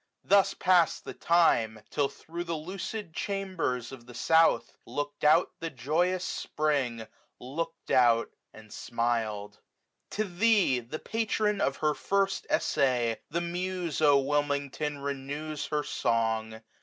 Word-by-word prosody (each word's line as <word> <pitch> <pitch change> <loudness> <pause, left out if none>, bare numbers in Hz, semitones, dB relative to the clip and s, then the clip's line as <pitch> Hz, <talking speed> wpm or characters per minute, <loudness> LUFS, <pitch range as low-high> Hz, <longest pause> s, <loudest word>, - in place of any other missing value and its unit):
Thus 200 0 +4
pass'd 180 -2 +3
the - - -6
time. 120 -11 +3
Til) 145 -2 +1
thro' 170 +2 -8
the 170 -1 -3
lucid 185 +3 -6
chambers 185 - -2
of 120 -3 -11
the 120 - -11
south 165 0 +4
15 - - -50 0.2
Look'd 145 0 -3
out 150 - +5
the 165 - -3
joyous 165 +8 0
Spring, 135 -7 -1 0.3
look'd 165 +6 -5
out, 120 -2 +4 0.2
and 110 -1 -14
smil'd. 115 -3 -2 0.5
To 215 - -1
thee, 200 - +3
the 120 +6 -6
patron 210 0 -1
of 135 - +1
her 155 -1 +1
first 195 +4 0
essay. 125 -7 +1
The 170 +3 -1
Muse, 175 -2 -3
O 145 -2 +6
Wilmington! 145 +1 -1
renews 140 +2 -4
her 150 -1 -1
song. 110 -2 -1
150 Hz, 130 wpm, -29 LUFS, 125-175 Hz, 0.5 s, O